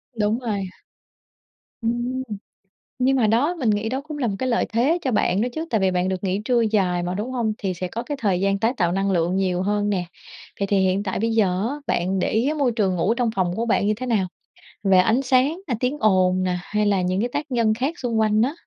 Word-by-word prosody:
Đúng 215 +2 +1
rồi. 210 -5 -2 1.2
Ừm. 240 +3 -1 0.8
Nhưng 265 +1 +3
mà 225 -4 +3
đó 260 +11 +2
mình 235 -5 +1
nghĩ 210 +2 0
đó 265 +2 -2
cũng 300 0 -8
là 250 -5 0
một 200 - -2
cái 255 - -1
lợi 235 - +1
thế 275 +9 +3
cho 260 - -1
bạn 205 -2 +1
đó 245 - +1
chứ, 320 +1 -3
tại 220 -5 +1
vì 190 -1 +2
bạn 180 +1 0
được 185 0 -3
nghỉ 195 +2 -1
trưa 245 -2 +3
dài 190 -5 +1
mà, 180 +1 -2
đúng 225 +6 -3
hông? 230 -4 -1
Thì 190 -3 -2
sẽ 180 +1 -4
có 230 +6 -5
cái 290 -2 -4
thời 190 -4 +1
gian 195 0 +1
tái 230 +4 +1
tạo 175 -3 +2
năng 195 +1 0
lượng 175 +1 +1
nhiều 185 -2 0
hơn 205 +1 0
nè. 180 -3 -1 0.5
Vậy 200 - 0
thì 200 -1 +2
hiện 190 +1 +1
tại 190 -1 -2
bây 225 +1 0
giờ 220 -2 +3 0.2
á 285 - -3
bạn 185 +2 0
để - - 0
ý 245 +8 +1
môi 280 -5 +1
trường 200 -5 0
ngủ 195 +6 +1
trong 240 -2 0
phòng 180 -2 0
của 230 - -1
bạn 210 -2 +1
như 215 - +3
thế 255 +4 -5
nào? 210 -6 +1 0.6
Về 190 -1 +4
ánh 220 +8 +4
sáng 270 +6 +2
nè, 250 - -1
tiếng 260 +4 -1
ồn 185 -3 +3
nè 180 -1 0
hay 210 +1 -1
là 200 -2 +2
những 185 +1 0
cái 245 - -1
tác 290 -1 -3
nhân 230 -3 +2
khác 275 +9 -2
xung 235 -3 -1
quanh 215 0 +3
á. 270 +6 +1
215 Hz, 255 wpm, -23 LUFS, 190-245 Hz, 1.2 s, Về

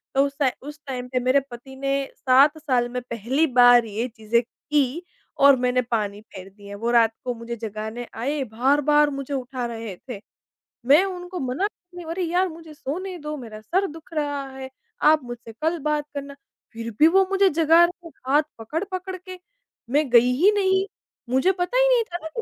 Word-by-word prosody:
तो 275 - +4
उस 280 - -4
टाइ 270 -3 +3 0.2
उस 295 +1 -9
टाइम 250 -2 -4
पे 255 - 0
मेरे 255 +3 +3
पति 250 +3 -10
ने 275 +1 -2 0.3
7 275 +4 +4
साल 255 -6 0
में 250 +1 -4
पहली 245 +5 0
बार 245 -1 +7
ये 220 +3 -3
चीज़ें 225 0 0
की 295 +5 -2 0.4
और 280 -1 +8
मैंने 250 0 +2
पानी 210 -4 -2
फेर 190 -3 -12
दिया। 200 0 -11
वो 230 +2 -1
रात 230 -2 +4
को 245 - -1
मुझे 230 +1 -6
जगाने 220 +2 -6
आए, 275 +4 -2
बार-बार 290 +6 +2
मुझे 275 0 -5
उठा 255 -1 -3
रहे 225 -4 -6
थे, 220 - -5 0.7
मैं 290 +8 +6
उनको 360 -1 -6
मना 265 +8 -1
करी, 355 -3 -13
"अरे 360 +2 -2
यार, 355 +2 +1
मुझे 325 -1 -11
सोने 360 +6 -5
दो, 300 0 -5
मेरा 220 -4 -9
सर 375 - 0
दुःख 325 +1 -13
रहा 290 -2 -2
है, 265 0 -7 0.3
आप 305 -1 +5
मुझसे 240 -2 -9
कल 325 +2 +1
बात 300 -1 0
करना।" 280 0 -6 0.4
फिर 230 0 -6
भी 310 - +8
वो 385 +3 +4
मुझे 390 0 +4
जगा 325 +2 +5
रहे 350 -1 -8
थे, - - -23
हाथ 295 +3 +4 0.2
पकड़-पकड़ 370 - -4
के, 370 0 -11 0.5
मैं 290 +1 +1
गई 245 +1 +6
ही 400 +3 +6
नहीं। 380 -1 +2 0.4
मुझे 265 +9 +3
पता 365 +6 -2
ही - - +5
नहीं 475 - +3
था 345 -5 -6
ना 320 - -4
कि 390 +9 -5
275 Hz, 195 wpm, -23 LUFS, 240-330 Hz, 0.7 s, और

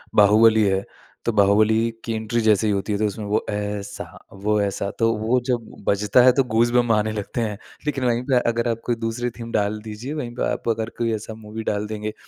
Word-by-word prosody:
बाहुबली 110 +2 +6
है, 95 0 +1 0.4
तो - - +2
बाहुबली 110 +3 +4
की 115 - -2
एंट्री 110 +1 -1
जैसे 110 -1 +3
ही 105 - +2
होती 100 +2 -2
है, - - 0
तो 110 - +2
उसमें 105 +1 -5
वो 105 +2 0
ऐसा, 105 -1 -4 0.3
वो 105 +2 0
ऐसा 100 0 -2
तो 115 0 +3
वो 115 +4 +1
जब 120 -3 -2 0.2
बजता 105 +5 +4
है, 130 - +8
तो 135 - +3
गूज़बम्प 120 0 +3
आने 110 0 +1
लगते 105 +3 -3
हैं। 105 -3 -2 0.3
लेकिन 135 -3 -1
वहीं 120 0 +1
पे 125 - +5
अगर 115 +1 0
आप 115 0 -2
कोई 120 - +1
दूसरी 120 +2 -2
थीम 115 0 -7
डाल 105 +1 0
दीजिए, 110 +6 -6
वहीं 125 -6 -4
पे - - -2
आप - - -3
अगर 115 0 -1
कोई 115 -1 +1
ऐसा 110 +1 -7
मूवी 110 +1 -6
डाल 105 0 -2
देंगे, 110 0 -4
110 Hz, 220 wpm, -22 LUFS, 105-115 Hz, 0.4 s, है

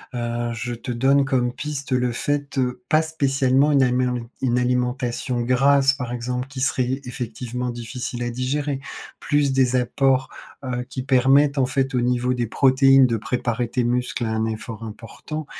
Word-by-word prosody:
heu, 120 0 -2
je 120 +1 -4
te 120 +1 -5
donne 135 +3 +3
comme 125 -2 +1
piste 140 +1 -6
le 125 -1 +1
fait, 145 +3 -2
heu, 125 -1 -1
pas 155 +3 +4
spécialement 140 -2 +2
une 135 -2 +5
amélemi 125 -1 +1 0.2
une 125 -2 +1
alimentation 125 0 -1
grasse 135 +3 +4
par 125 -4 -5
exemple, 125 +1 -3
qui 135 -1 -7
serait 130 0 0
effectivement 125 0 -5
difficile 120 +1 -5
à 120 - -2
digérer. 135 +3 -2 0.4
Plus 145 -2 +1
des 130 -1 +2
apports, 130 +1 +1 0.3
heu, 125 -1 -3
qui 130 - -5
permettent 135 +2 +4
en 130 - +3
fait 135 +1 -1
au 125 - +2
niveau 125 +1 +1
des 120 -2 -2
protéines 135 +2 +5
de 115 -2 0
préparer 120 +1 -2
tes 125 +1 0
muscles 125 +1 -1
à 115 - -1
un 110 0 0
effort 110 0 -5
important, 115 +8 -7
125 Hz, 170 wpm, -22 LUFS, 120-135 Hz, 0.4 s, une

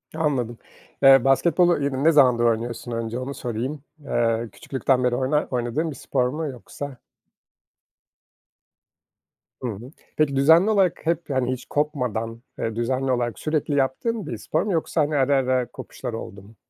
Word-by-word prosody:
Anladım. 130 -7 -1 0.5
Iıı, 135 -2 +8
basketbolu 165 +4 +3
yine 140 0 -1
ne 165 - +6
zamandır 125 -6 +5
oynuyorsun 115 +1 -1
önce, 115 +1 -3
onu 130 +2 -4
sorayım. 130 +4 -4 0.2
Eee, 115 -4 0
küçüklükten 130 -1 0
beri 125 -1 +2
oynar 135 +4 0
oynadığın 125 +6 -1
bir - - -8
spor 125 -1 0
mu 155 +4 -3
yoksa? 135 +1 -8 2.6
Hı 125 - -2
hı. 115 +4 -7 0.3
Peki 150 -3 +2
düzenli 160 +8 +5
olarak 195 -8 +2
hep, 170 0 -1
hani, 130 -2 0
hiç 125 - -8
kopmadan, 125 -6 -2 0.2
eee, 115 -1 -2
düzenli 130 +3 0
olarak 120 -2 -1
sürekli 155 -1 -1
yaptığın 165 - -1
bir 115 - -4
spor 155 - -1
mu 210 - -2
yoksa, 160 0 0
hani, 150 +1 0
ara 140 0 +3
ara 130 -2 +1
kopuşlar 125 -3 -7
oldu 100 -3 -7
mu? 105 +4 -17
130 Hz, 155 wpm, -24 LUFS, 120-150 Hz, 2.6 s, Iıı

